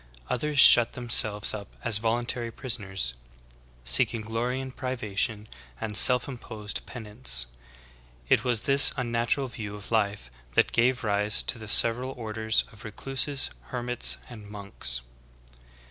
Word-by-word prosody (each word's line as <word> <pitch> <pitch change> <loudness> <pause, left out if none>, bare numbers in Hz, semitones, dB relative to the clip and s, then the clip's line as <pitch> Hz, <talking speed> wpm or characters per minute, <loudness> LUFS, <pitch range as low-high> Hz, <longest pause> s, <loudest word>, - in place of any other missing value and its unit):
Others 150 +4 -3
shut 120 -3 +7
themselves 110 -4 +2
up 105 -2 -7 0.2
as 110 -3 +2
voluntary 120 +1 -2
pris 120 0 -4
oners, 95 -11 -4 0.7
seeking 65 - +2
glory 115 +4 -4
in 135 0 -7
privation 115 -4 -3 0.3
and 105 -1 -5
self 125 +4 +5
imposed 110 -5 -7
penance. 105 - -4 0.8
It - - +2
was 120 -3 -1
this 140 0 +8
unnatural 120 +2 -1
view 105 -4 -7
of 105 +2 -10
life 100 - -2 0.2
that - - +2
gave 125 +2 0
rise 105 0 0
to 120 - -3
the 110 - -10
sev 115 +2 +6
eral 130 +1 -7
orders 110 -1 -1
of 110 - -15
recluses, 135 +6 -2
hermits, 125 -1 -2
and 110 -4 -13
monks. 100 - -3
115 Hz, 135 wpm, -26 LUFS, 105-125 Hz, 0.8 s, this